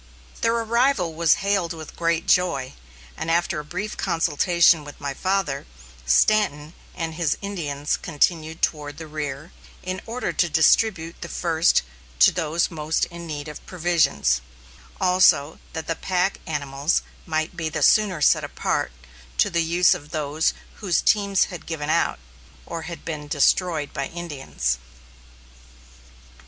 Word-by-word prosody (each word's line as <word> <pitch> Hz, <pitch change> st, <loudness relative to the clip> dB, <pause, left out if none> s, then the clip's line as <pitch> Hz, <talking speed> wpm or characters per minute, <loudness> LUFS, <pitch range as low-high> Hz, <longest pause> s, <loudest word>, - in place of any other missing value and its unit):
Their 230 Hz, 0 st, +2 dB
arrival 230 Hz, -5 st, +1 dB
was 165 Hz, +3 st, +2 dB
hailed 195 Hz, -4 st, +1 dB
with 160 Hz, -2 st, -10 dB
great 170 Hz, -1 st, 0 dB
joy, 155 Hz, -8 st, +2 dB, 0.4 s
and 160 Hz, -, -4 dB
after 170 Hz, 0 st, +1 dB
a -, -, -6 dB
brief 185 Hz, +8 st, -5 dB
consultation 165 Hz, 0 st, +3 dB
with 145 Hz, -1 st, -11 dB
my 140 Hz, -1 st, -3 dB
father, 185 Hz, -4 st, -1 dB, 0.4 s
Stanton 150 Hz, -, +3 dB, 0.2 s
and 165 Hz, -2 st, -3 dB
his 160 Hz, -2 st, 0 dB
Indians 150 Hz, -8 st, -2 dB
continued 160 Hz, 0 st, -1 dB
toward 145 Hz, -2 st, -1 dB
the 160 Hz, -, -7 dB
rear, 150 Hz, 0 st, -5 dB, 0.3 s
in 185 Hz, 0 st, -4 dB
order 240 Hz, +3 st, -3 dB
to 175 Hz, -, +1 dB
distribute 165 Hz, +1 st, +3 dB
first 165 Hz, -, +2 dB, 0.3 s
to -, -, +7 dB
those 165 Hz, 0 st, 0 dB
most 155 Hz, -1 st, 0 dB
in 170 Hz, 0 st, -8 dB
need 150 Hz, -1 st, -5 dB
of 150 Hz, -, -9 dB
provisions, 160 Hz, -, +1 dB, 0.6 s
also 180 Hz, -5 st, +4 dB
that 160 Hz, -, -4 dB
the 165 Hz, -, -2 dB
pack 185 Hz, +2 st, 0 dB
animals 140 Hz, 0 st, -1 dB, 0.2 s
might 155 Hz, 0 st, -1 dB
be 160 Hz, -2 st, -2 dB
the -, -, -2 dB
sooner 200 Hz, -7 st, +4 dB
set -, -, +4 dB
apart -, -, -2 dB, 0.5 s
to -, -, +3 dB
the 170 Hz, -1 st, +2 dB
use 170 Hz, +2 st, +4 dB
of 145 Hz, -, -8 dB
those 150 Hz, +1 st, 0 dB, 0.2 s
whose 185 Hz, -5 st, +1 dB
teams 200 Hz, -2 st, +3 dB
had 170 Hz, -, -9 dB
given 155 Hz, -2 st, -2 dB
out, -, -, +1 dB, 0.5 s
or 165 Hz, -1 st, -5 dB
had 170 Hz, -, -8 dB
been 150 Hz, -2 st, -5 dB
destroyed 150 Hz, +1 st, +1 dB
by 140 Hz, -1 st, -2 dB
Indians. 135 Hz, -, -3 dB
165 Hz, 140 wpm, -23 LUFS, 150-180 Hz, 0.6 s, to